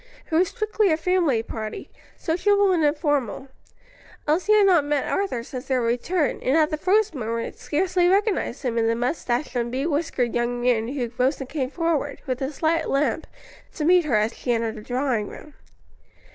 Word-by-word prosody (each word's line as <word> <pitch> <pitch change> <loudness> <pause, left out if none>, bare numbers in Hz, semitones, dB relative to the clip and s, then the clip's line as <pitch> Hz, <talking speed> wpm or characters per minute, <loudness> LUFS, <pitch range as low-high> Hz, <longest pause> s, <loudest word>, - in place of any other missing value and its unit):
It - - -5
was 350 +3 +4
strictly 430 -3 0
a 315 - +2
family 330 -9 +1
party, 220 -2 -6 0.3
sociable 400 +4 +2
and 340 -3 +2
informal. 290 - 0 0.8
Elsie 345 +8 +2
had 420 -1 +6
not 355 -6 +5
met 290 -1 -1
Arthur 385 -13 -1
since 250 +2 -8
their 260 -2 +1
return, 250 +8 0
and 265 +5 +2
at 310 -1 +3
the - - +1
first 400 +3 +2
moment 230 -3 -4
scarcely 355 +3 +1
recognized 400 -1 +1
him 235 -3 0
in 225 - +2
the 230 - +2
moustached 245 +2 -2
and 235 -1 -1
bewhiskered 275 -2 -1
young 240 0 -1
man 240 -2 +1
who 250 -3 -3
rose 255 +2 +2
and 265 -2 -6
came 270 -4 -2
forward, 305 -3 -1
with 255 +1 -3
a 265 +2 -2
slight 320 +2 0
limp, 280 +2 0 0.5
to 305 - -2
meet 355 0 +5
her 265 -7 +1
as 215 +2 +1
she 245 - -3
entered 230 -1 0
the - - -8
drawing 245 -2 -1
room. 300 - -11
285 Hz, 185 wpm, -24 LUFS, 245-340 Hz, 0.8 s, had